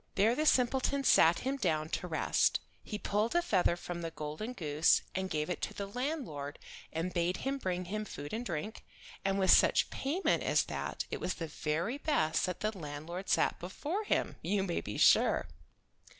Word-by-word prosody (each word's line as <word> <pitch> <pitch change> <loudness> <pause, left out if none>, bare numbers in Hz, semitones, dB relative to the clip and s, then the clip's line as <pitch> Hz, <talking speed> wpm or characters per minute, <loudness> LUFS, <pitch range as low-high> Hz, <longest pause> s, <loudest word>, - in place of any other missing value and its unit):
There 220 +4 +4
the 310 +4 0
simpleton 265 +2 +2
sat 165 -9 +5
him 270 +2 -1
down 160 - 0
to 180 - -3
rest. 160 - +2 0.2
He 210 - -5
pulled 210 +6 -1
a 345 - +5
feather 185 - +2
from 175 0 -6
the 165 - -3
golden 155 +9 -5
goose, 155 -6 +2
and 190 0 -2
gave 150 -2 -1
it 180 - -3
to - - -3
the 200 - -3
landlord 205 - -4 0.3
and 165 +3 -3
bade 175 +1 0
him 275 +1 -1
bring 180 -4 -2
him 215 +4 -3
food 145 -7 -7
and 230 +2 -2
drink, 175 +1 -5 0.4
and 195 0 +1
with 190 -1 +4
such - - +5
payment 315 +8 0
as - - +2
that - - -4
it - - -3
was 185 - -1
the 165 - -4
very 165 - -2
best 190 - +1
that 180 - -4
the 215 0 -1
landlord 165 +3 -6
sat - - +2
before 300 - -3
him - - 0
you 200 -1 0
may 175 -3 -1
be - - -6
sure. - - +5
190 Hz, 190 wpm, -32 LUFS, 165-240 Hz, 0.4 s, sat